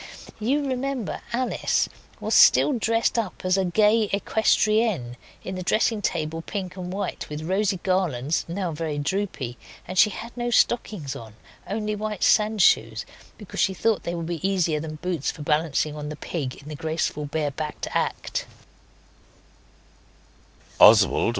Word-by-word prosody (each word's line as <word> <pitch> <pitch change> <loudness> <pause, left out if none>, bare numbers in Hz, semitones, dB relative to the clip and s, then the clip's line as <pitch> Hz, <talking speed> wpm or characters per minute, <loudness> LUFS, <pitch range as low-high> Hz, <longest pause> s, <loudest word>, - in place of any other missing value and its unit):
You 275 +7 +1
remember 260 -3 -3
Alice 250 +2 0 0.3
was - - -2
still 295 - +6
dressed 230 0 +1
up 200 -4 -5
as 185 - +2
the 190 0 +2
gay 210 +4 +3
equestrienne 215 - +1 0.3
in 185 - -5
the 185 - -4
dressing 215 +3 +1
table 165 -3 -2
pink 185 0 -5
and 180 -1 -6
white, 200 +2 -4
with 150 +1 -5
rosy 190 +2 0
garlands, 165 -7 0
now 175 0 -3
very 155 -1 -3
droopy, 145 - -3 0.3
and 185 +1 -1
she - - +7
had 230 +4 -8
no 240 0 -2
stockings 215 - +1
on, 110 -2 -10 0.3
only 210 +1 -2
white 210 -1 -3
sand 215 -2 +4
shoes, 110 -5 +3 0.3
because 210 - -8
she 190 -2 +2
thought 225 +2 +1
they 170 - -4
would 170 -1 -4
be 170 0 -3
easier 175 -5 +1
than 155 0 -6
boots 170 -2 -2
for 150 - -6
balancing 150 0 0
on 150 0 -5
the 150 - -5
pig 145 -4 -4
in 145 - -14
the 155 - -6
graceful 160 -1 -2
bare 145 0 -2
backed 150 +2 -5
act. - - -2
185 Hz, 150 wpm, -24 LUFS, 155-215 Hz, 0.3 s, she